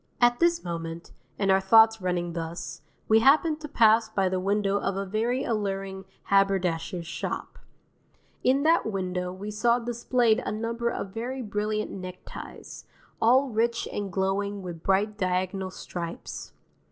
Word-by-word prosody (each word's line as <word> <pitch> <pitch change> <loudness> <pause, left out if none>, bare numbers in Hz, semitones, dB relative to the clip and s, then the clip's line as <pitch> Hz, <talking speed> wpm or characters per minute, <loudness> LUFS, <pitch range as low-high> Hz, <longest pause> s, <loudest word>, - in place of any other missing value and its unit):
At 240 0 +4
this 340 0 +3
moment, 165 -1 -5 0.3
and 195 -1 +2
our 190 - +5
thoughts 225 +2 +6
running 175 -2 -1
thus, 165 0 -5 0.3
we 220 0 +6
happened 305 +5 +4
to 300 - -5
pass 225 -4 +4
by 195 -3 +1
the 185 0 -1
window 200 +1 +1
of 195 -1 -2
a 195 - -2
very 230 +6 0
alluring 195 -3 -3 0.3
haberdasher's 185 -3 +1
shop. 170 - -5 0.8
In 270 +2 +3
that 325 -4 +3
window 180 -2 -2
we 200 +3 -6
saw 235 +3 +2
displayed 240 0 +1
a - - -3
number 230 +2 -2
of 195 -4 -5
very 250 +3 -4
brilliant 210 0 -2
neckties, 185 -1 -9 0.4
all 260 +4 +4
rich 230 +1 0
and 205 -2 -3
glowing 195 +1 -1
with 170 -3 -7
bright 205 +3 +1
diagonal 185 0 -1
stripes. 170 -2 -7
205 Hz, 145 wpm, -27 LUFS, 185-230 Hz, 0.8 s, thoughts